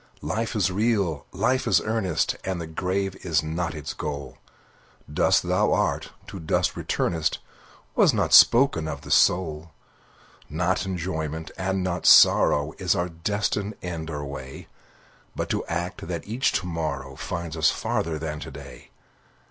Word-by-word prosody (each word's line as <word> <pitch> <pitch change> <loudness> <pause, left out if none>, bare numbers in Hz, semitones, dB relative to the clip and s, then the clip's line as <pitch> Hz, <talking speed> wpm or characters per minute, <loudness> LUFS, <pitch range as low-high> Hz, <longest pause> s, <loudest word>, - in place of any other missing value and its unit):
Life 110 +11 -2
is 95 -3 +1
real! 100 -6 0
Life 130 +1 0
is - - +4
earnest! 110 -7 -1
And 95 -2 -3
the 85 - -4
grave 95 +4 -2
is 80 -5 0
not 80 0 -3
its 75 -2 -5
goal; 70 -3 -6 0.7
Dust - - +3
thou - - +1
art, - - 0 0.2
to 95 - -8
dust 80 - 0
returnest, 80 -2 -1 0.6
Was - - +5
not - - 0
spoken 120 - +6
of 70 -2 -5
the - - -9
soul. 80 -3 +2 0.8
Not 90 +5 0
enjoyment, 80 -4 -4
and 95 0 -1
not 90 -1 -1
sorrow, 75 +1 +6
Is 95 +1 +1
our 90 -1 -1
destined 105 +4 -2
end 85 -3 -5
or 75 -2 -4
way; 65 -1 -8 0.7
But - - -3
to - - -1
act, 85 +1 -4
that 85 -1 -5
each 120 +5 +1
to - - -1
morrow 70 -6 -4
Find 85 +3 -5
us 80 -2 +3
farther 80 -1 -2
than 75 -1 -4
to - - -7
day. - - -12
85 Hz, 150 wpm, -25 LUFS, 80-95 Hz, 0.8 s, spoken